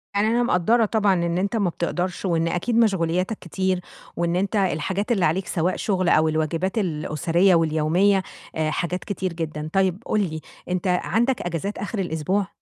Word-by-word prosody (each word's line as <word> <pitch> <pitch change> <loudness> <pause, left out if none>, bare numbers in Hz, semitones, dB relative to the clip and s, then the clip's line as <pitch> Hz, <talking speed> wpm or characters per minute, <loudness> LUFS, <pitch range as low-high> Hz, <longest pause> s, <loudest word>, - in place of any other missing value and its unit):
يعني 205 +2 +3
أنا 235 +2 +2
مقدّرة 225 +2 +3
طبعًا 210 -2 +2
إن 170 -1 0
أنتَ 200 +4 -1
ما 200 -5 +1
بتقدرش، 175 +2 -3
وإن 165 -2 +1
أكيد 180 +8 -1
مشغولياتك 190 -2 +1
كتير، 185 +1 -1 0.3
وإن 170 0 0
أنت 195 +4 0
الحاجات 190 +2 0
اللي 195 -7 +2
عليك 175 +5 0
سواء 175 +1 0
شغل 185 -4 0
أو 155 +1 +4
الواجبات 160 +5 -1
الأسرية 175 0 +2
واليومية، 165 +5 +2 0.3
آآ 155 -1 0
حاجات 180 +3 -2
كتير 190 -3 -3
جدًا، 155 -2 -4
طيب 195 +2 +1
قُل 215 - +1
لي، 160 -5 -3 0.3
أنتَ 180 +1 -1
عندك 225 +8 +1
إجازات 175 +4 -3
آخر 205 +1 -4
الأسبوع؟ 185 +3 -1
180 Hz, 165 wpm, -23 LUFS, 165-200 Hz, 0.3 s, أو